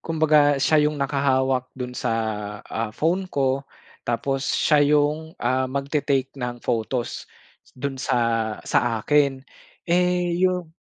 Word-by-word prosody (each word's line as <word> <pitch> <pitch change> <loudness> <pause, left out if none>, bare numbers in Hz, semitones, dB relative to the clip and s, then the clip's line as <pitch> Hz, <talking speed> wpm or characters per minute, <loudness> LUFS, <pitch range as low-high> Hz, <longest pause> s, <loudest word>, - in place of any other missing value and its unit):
Kumbaga 155 -3 +3
siya 150 +2 +3
yung 150 - -5
nakahawak 135 -2 +1
dun 125 -1 -5
sa, 125 - -2 0.5
ah, 115 0 -3
phone 180 +8 0
ko 135 -2 0 0.5
tapos 135 +3 -1
siya 150 0 +3
yung, 155 +2 0
ah, 130 +2 +1
magte-take 140 -1 -1
ng 125 -2 -4
photos 120 +2 -2 0.5
dun 135 +1 -3
sa 115 -3 0
sa 115 -2 +1
akin. 140 -3 +2 0.4
Eh, 180 0 +2
yung 180 -3 0
140 Hz, 120 wpm, -23 LUFS, 125-150 Hz, 0.5 s, Kumbaga